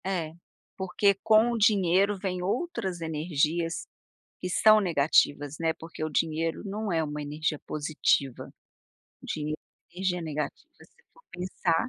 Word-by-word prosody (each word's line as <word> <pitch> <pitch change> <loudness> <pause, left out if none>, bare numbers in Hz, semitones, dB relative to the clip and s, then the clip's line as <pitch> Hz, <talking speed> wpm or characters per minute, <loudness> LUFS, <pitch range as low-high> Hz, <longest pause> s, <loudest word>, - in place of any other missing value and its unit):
É. 170 -5 -2 0.4
Porque 195 +1 +2
com 220 +2 +5
o 235 - -1
dinheiro 200 -2 +3
vem 185 -1 -3
outras 195 - -2
energias 160 +1 -1 0.5
que 180 - -4
são 215 +4 +6
negativas, 145 -4 +2
né, 165 -1 +1
porque 160 -1 -8
o 155 - -1
dinheiro 160 +1 0
não 205 +1 -3
é 165 -1 +2
uma 150 -1 -4
energia 150 +1 -2
positiva. 145 -3 0 0.7
O - - -12
dinheiro 155 0 -3 0.3
é - - -22
energia 180 -2 -1
negativa 150 - -4
se - - -27
for - - -22
pensar 180 +2 -1
170 Hz, 140 wpm, -28 LUFS, 155-195 Hz, 0.7 s, são